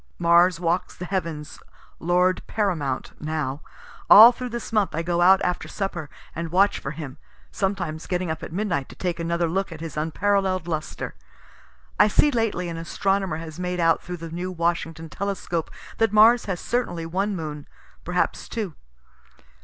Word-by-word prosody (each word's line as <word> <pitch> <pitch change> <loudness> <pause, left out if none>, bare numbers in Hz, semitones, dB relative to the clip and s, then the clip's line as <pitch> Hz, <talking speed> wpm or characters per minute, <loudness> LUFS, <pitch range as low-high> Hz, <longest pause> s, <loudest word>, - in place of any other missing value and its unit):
Mars 170 0 +4
walks 175 +1 -1
the 180 - -6
heavens 165 -5 -4 0.4
lord 180 +2 +2
paramount 165 -11 -1
now; 155 -2 -3 0.5
all 225 +4 +11
through 250 +1 -6
this 235 -1 -6
month 210 -6 +1
I 165 - -1
go 175 0 0
out 190 +2 +7
after 180 0 -1
supper 175 -6 -4 0.3
and 165 0 -4
watch 195 +3 +3
for - - -5
him; 145 -1 -7 0.3
sometimes 180 -5 -2
getting 180 -2 -1
up 160 - -5
at - - -7
midnight 170 -7 -2
to - - -11
take 175 -2 -3
another 170 0 0
look 190 +3 -1
at 160 - -8
his 165 -1 -7
unparallel'd 185 +3 0
lustre. 155 -2 -4 0.9
(I 210 - +7
see 295 +8 +4
lately 225 -7 0
an 165 -1 -5
astronomer 190 +1 -1
has 160 0 -8
made 180 0 -2
out 165 -1 +3
through 180 0 -6
the 165 -1 -8
new 180 +2 -4
Washington 165 -1 -2
telescope 185 -2 -3 0.3
that 225 -2 +3
Mars 220 +3 +6
has 190 -3 -3
certainly 230 -9 -2
one 195 +5 -1
moon, 150 -4 -6 0.4
perhaps - - -1
two.) 210 -8 -3
175 Hz, 165 wpm, -24 LUFS, 165-195 Hz, 0.9 s, all